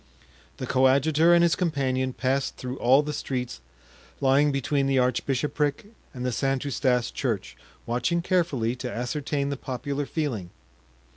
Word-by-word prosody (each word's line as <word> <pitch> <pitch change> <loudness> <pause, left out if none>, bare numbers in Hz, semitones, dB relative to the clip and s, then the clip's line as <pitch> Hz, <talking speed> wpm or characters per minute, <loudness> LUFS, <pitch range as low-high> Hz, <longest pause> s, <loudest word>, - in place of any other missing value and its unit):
The - - -4
coadjutor 140 +5 +4
and 170 0 +6
his 170 0 +3
companion 135 -7 0
passed 130 +2 -1
through 125 +1 -6
all 130 +4 +5
the 150 0 -4
streets 125 - -4 0.6
lying 140 +2 +4
between 140 0 0
the 135 -1 +2
archbishopric 140 - 0 0.2
and 125 -2 -6
the 125 - 0
St. 135 +2 -1
Eustache 125 -3 +1
Church, 115 -8 -2 0.3
watching 170 +9 0
carefully 150 -11 +1
to 125 -1 -5
ascertain 140 +3 -2
the 140 - -3
popular 135 +3 -4
feeling. 125 - -3
135 Hz, 140 wpm, -26 LUFS, 125-145 Hz, 0.6 s, and